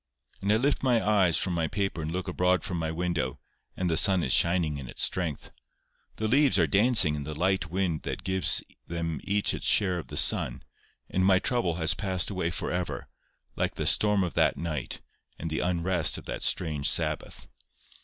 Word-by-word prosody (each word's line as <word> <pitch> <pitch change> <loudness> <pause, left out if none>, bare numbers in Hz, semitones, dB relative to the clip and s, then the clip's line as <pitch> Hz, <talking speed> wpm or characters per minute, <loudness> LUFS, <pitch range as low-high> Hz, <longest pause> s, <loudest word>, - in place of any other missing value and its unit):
And 100 +1 0
I - - +4
lift 135 +6 +1
my 120 -5 +1
eyes 95 -6 +3
from 90 - -1
my 85 -1 0
paper 95 0 -3
and 80 0 -4
look 90 +3 -4
abroad 90 -1 +1
from 90 -3 -4
my 80 -1 -2
window, 80 -5 -2 0.4
and 90 - -1
the 85 - +1
sun 95 +1 +4
is 65 - +2
shining 85 -4 +2
in 65 - -8
its - - -1
strength. 85 -6 -2 0.6
The 110 - -2
leaves 135 +2 +3
are 85 - +4
dancing 100 - +4
in 75 -1 -4
the 75 +1 -6
light 95 +1 0
wind 90 -3 -1
that - - -5
gives 95 -6 +1 0.2
them 85 -3 -4
each 100 +1 0
its - - -3
share 95 -4 +3
of - - -9
the - - -4
sun, - - +2 0.4
and 95 - -1
my 95 0 +5
trouble 95 -5 -1
has 80 -1 +1
passed 95 -2 0
away 90 -4 -2
for 85 - -4
ever, 90 0 -4 0.5
like - - -2
the - - -3
storm 105 -2 +4
of 90 - -3
that - - +2
night 80 -6 -4 0.4
and 80 0 -5
the 80 - -1
unrest 90 -1 +1
of - - -11
that - - -5
strange 75 -4 0
Sabbath. 75 -2 -2
90 Hz, 200 wpm, -27 LUFS, 80-95 Hz, 0.6 s, my